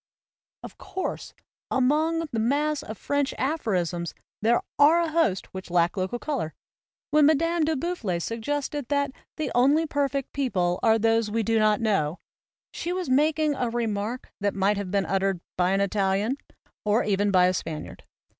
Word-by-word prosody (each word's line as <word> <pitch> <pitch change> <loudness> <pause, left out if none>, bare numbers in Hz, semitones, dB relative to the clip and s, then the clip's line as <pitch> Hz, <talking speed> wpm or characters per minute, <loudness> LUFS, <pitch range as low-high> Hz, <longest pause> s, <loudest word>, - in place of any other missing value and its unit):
Of - - -10
course, 380 - -5 0.3
among 310 +5 +2
the 225 - -1
mass 290 +5 +1
of 220 -7 -8
French 285 -1 -1
apho 280 -2 -1
risms 175 -3 -1 0.3
there 230 +3 +3 0.2
are 305 +4 +7
a 335 -2 0
host 310 - 0
which 190 -1 -7
lack 175 +1 +2
local 190 +4 -2
color. 245 - -3 0.6
When 300 -1 +6
Madame 330 +2 +2
de 315 0 +1
Boufflers 250 - -2
suggested 285 +4 -3
that 285 -1 +1 0.3
"the 310 - -2
only 280 +6 +4
perfect 280 -3 -1
people 185 -11 0
are 225 -1 +4
those 225 0 +2
we 225 +1 0
do 225 +1 +2
not 215 +1 +3
know," 190 -8 +1 0.6
she 345 - -3
was 360 -6 -2
making 305 +2 +3
a 250 -3 -1
remark 230 0 -3
that 205 0 0
might 200 +1 +2
have 200 -2 -4
been 200 0 +1
uttered 195 -1 0 0.2
by 180 0 +2
an 195 +1 +2
Italian 200 +5 +1 0.5
or 215 +3 +2
even 205 0 +1
by 185 -2 +5
a 180 - +3
Spaniard. 160 -4 -5
230 Hz, 165 wpm, -26 LUFS, 195-290 Hz, 0.6 s, are